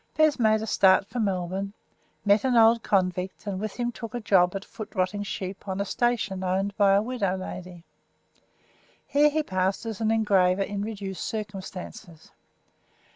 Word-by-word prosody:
Bez 310 -3 +4
made 220 -1 +3
a - - -2
start 195 -3 +4
for 235 +4 -5
Melbourne, 195 -1 -2 0.5
met 205 +1 +4
an 260 -2 +2
old 230 0 +6
convict, 185 -1 -1
and 195 -2 -3
with 215 0 -4
him 240 0 -2
took 230 -1 -8
a - - -1
job 190 -4 +3
at 195 - -5
foot 215 -2 -9
rotting 185 +2 0
sheep 195 -1 -6
on 190 0 -3
a 200 - 0
station 225 -5 -1
owned 195 +2 -1
by 200 -2 +4
a 200 +1 +3
widow 210 -6 -1
lady. 180 -2 -8 1.2
Here 295 +1 +4
he 310 +1 0
passed 190 -1 -1
as 225 -1 -5
an 220 - +1
engraver 195 -4 +3
in 200 0 -4
reduced 200 -3 -5
circumstances. 190 -5 -7
200 Hz, 170 wpm, -26 LUFS, 190-220 Hz, 1.2 s, old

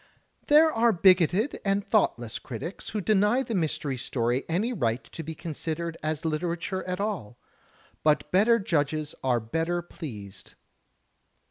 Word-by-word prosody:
There 310 +2 +6
are 230 +1 +4
bigoted 185 - +3
and 200 0 +1
thoughtless 120 - +1
critics 150 - -6
who 210 - -2
deny 210 +5 +3
the 235 - -5
Mystery 155 -6 -1
Story 120 +1 -1
any 205 +9 0
right 120 - -1
to - - -9
be 160 0 -6
considered 165 +1 -4
as 155 +1 -2
literature 170 +4 -2
at 180 0 -3
all. 190 - -3 0.7
But 150 -1 +2
better 215 +5 +5
judges 155 -6 -1
are 125 -2 +2
better 165 +10 -2
pleased. 110 - -9
170 Hz, 135 wpm, -27 LUFS, 145-200 Hz, 0.7 s, There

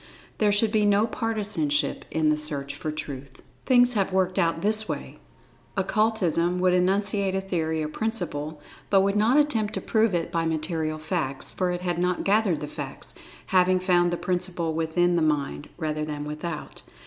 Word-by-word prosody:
There 210 -1 +3
should 210 +1 +3
be 215 -1 +2
no 205 +1 +4
partisanship 205 - -1
in 155 -1 +2
the - - +3
search 145 -2 -2
for 155 - -4
Truth. 135 -3 -8 0.2
Things 245 -1 +6
have 195 -3 0
worked 185 -1 +1 0.3
this 215 +1 +2
way: - - -5 0.6
Occultism 185 -4 +1
would 180 0 +3
enunciate 195 +1 +1
a - - +1
theory 160 -4 -2
or - - -2
principle—but 165 -2 -2
would 200 +1 +1
not 220 +6 +3
attempt 225 -8 +1
to - - -2
prove 220 -4 +2
it 165 -1 -2
by 165 -1 0
material 160 0 -1
facts, 155 -4 -3
for 185 -1 -1
it 175 0 -2
had 175 -1 -1
not 180 0 0
gathered 200 -5 +2
the 150 - -4
facts, - - -7 0.3
having 185 0 +3
found 175 -1 +3
the 175 - -2
principle 175 -3 -2
within 175 +2 +1
the - - +2
mind, 150 -1 -1
rather 155 -2 -2
than 150 -1 -4
without. 150 +1 -6
180 Hz, 170 wpm, -25 LUFS, 155-205 Hz, 0.6 s, Things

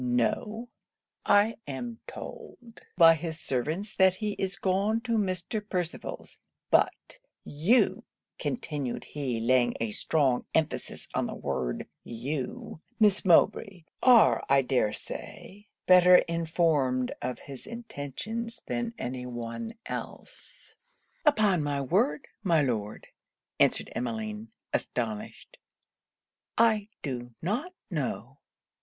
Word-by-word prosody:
'No; 210 - 0 0.6
I 205 +3 +4
am 225 - -5
told 245 - -10 0.2
by 165 -2 +9
his 160 0 -4
servants 155 - -2
that 190 -1 +5
he 210 +1 -2
is 190 0 -1
gone 200 +4 +1
to 240 0 -5
Mr. 205 -1 0
Percival's 180 -3 -4 0.3
But - - +1 0.2
you 175 - +2 0.4
'(continued 145 - -3
he, 130 -6 -3
laying 120 +1 +3
a 115 -2 -1
strong 135 +1 +1
emphasis 160 -2 -1
on - - 0
the - - -5
word) 65 -2 -3 0.2
'you, 130 +5 -5 0.2
Miss 210 -2 +4
Mowbray, 190 0 +3 0.2
are 245 -4 +6
I 135 0 +5
dare 125 -4 +1
say 205 - -8 0.2
better 180 0 +8
informed 160 -7 +1
of 125 - -3
his 135 -2 -10
intentions 230 - -5
than 235 -1 -3
any 125 0 -4
one 120 - -5
else.' - - -8 0.5
'Upon 210 - +4
my 145 -1 -1
word, 200 - +1
my 170 -7 +3
Lord,' 110 -5 -2 0.5
answered - - +2
Emmeline, 110 -2 -3 0.3
astonished, 110 -4 -4 1.0
'I 220 -3 +4 0.2
do 120 -4 -5
not 245 - -1 0.2
know. - - -3
165 Hz, 110 wpm, -28 LUFS, 125-215 Hz, 1.0 s, by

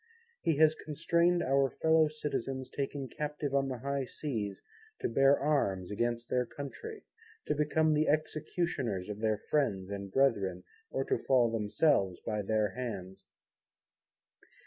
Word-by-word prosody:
He 165 - +2
has 155 0 +6
constrained 170 +3 +1
our 135 0 +3
fellow 160 +1 +3
Citizens 135 -4 -4
taken 140 -1 -3
Captive 150 0 -4
on 135 0 +2
the 130 -2 -3
high 140 +2 -2
Seas 110 -9 -4 0.4
to - - 0
bear 135 +4 +4
Arms 100 -11 0
against 120 +2 -1
their 125 -1 0
Country, 415 - -8 0.4
to - - +1
become 155 +1 +2
the 150 +1 +2
executioners 150 - -1
of 105 0 -5
their 110 -1 +1
friends 100 -8 -1
and 100 -1 -5
Brethren, 100 -9 +2 0.3
or - - -2
to 400 - 0
fall 125 -3 +3
themselves 105 - +2
by 105 -1 -1
their 105 +1 +1
Hands. 95 -6 -6
135 Hz, 140 wpm, -32 LUFS, 105-150 Hz, 0.4 s, has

